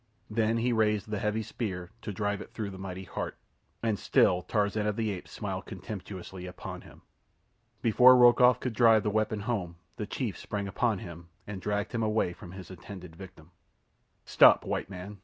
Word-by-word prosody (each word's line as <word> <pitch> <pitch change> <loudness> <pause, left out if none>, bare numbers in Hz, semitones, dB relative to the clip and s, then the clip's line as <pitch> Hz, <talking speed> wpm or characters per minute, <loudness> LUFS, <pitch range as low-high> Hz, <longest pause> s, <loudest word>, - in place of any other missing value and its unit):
Then 115 +1 +1
he 120 +1 +1
raised 105 -2 +1
the 105 - -1
heavy 105 +2 -1
spear 95 -6 -5
to - - -5
drive 105 0 -2
it - - -9
through 105 -3 -3
the 95 - -9
mighty 95 0 -6
heart, 90 - -5 0.5
and 110 -4 0
still 90 0 +3
Tarzan 105 +1 0
of 105 - 0
the 110 -1 -1
Apes 90 -3 -7
smiled - - -5
contemptuously 95 -2 -7
upon 90 - -8
him. - - -16 0.8
Before 125 +3 +7
Rokoff 125 0 +6
could 125 -2 -3
drive 115 -2 +5
the 105 - 0
weapon 110 0 0
home 100 -6 -2 0.2
the 105 - -4
chief 115 -4 -3
sprang 100 -1 -4
upon 110 +2 0
him 85 -1 -10 0.2
and 100 -2 -6
dragged 105 +1 -2
him 115 - -2
away 110 -5 +1
from 85 0 -11
his 95 -1 -10
intended 90 -1 -10
victim. 90 -3 -13 0.7
"Stop, - - +6
white - - -2
man!" 95 +2 -8
105 Hz, 180 wpm, -29 LUFS, 95-110 Hz, 0.8 s, Before